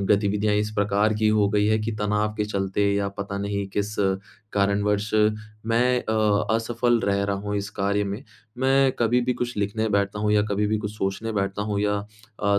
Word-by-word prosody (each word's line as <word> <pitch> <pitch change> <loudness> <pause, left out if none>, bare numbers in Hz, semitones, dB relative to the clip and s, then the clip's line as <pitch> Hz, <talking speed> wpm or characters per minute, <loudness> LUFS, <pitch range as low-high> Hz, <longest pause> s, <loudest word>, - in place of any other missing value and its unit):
गतिविधियाँ 105 +1 +2
इस 105 +1 0
प्रकार 105 +1 +2
की 110 0 +3
हो 105 -2 +3
गई 105 0 +2
हैं 110 0 +2
कि 115 +1 -2
तनाव 105 +1 0
के 105 - 0
चलते 100 -1 -1
या 100 0 0
पता 100 0 -4
नहीं 100 0 -2
किस 105 +1 -1 0.6
कारणवश 100 +1 +1 0.6
मैं 125 +2 +2
अ, 110 -1 +1
असफ़ल 120 +1 +1
रह 100 -1 +1
रहा 100 0 -1
हूँ 105 +1 -3
इस 100 0 -3
कार्य 100 +1 +1
में। 100 +5 -4 0.4
मैं 135 +1 +4
कभी 120 +1 +3
भी 125 - +1
कुछ 125 -2 -3
लिखने 105 +2 -1
बैठता 100 0 0
हूँ 105 0 +1
या 105 -1 +4
कभी 105 +1 +1
भी 110 0 0
कुछ 105 -1 -4
सोचने 105 +3 -2
बैठता 100 0 -1
हूँ 105 -1 -2
या 105 0 +1 0.5
अ, 100 -1 +3
105 Hz, 195 wpm, -24 LUFS, 100-110 Hz, 0.6 s, मैं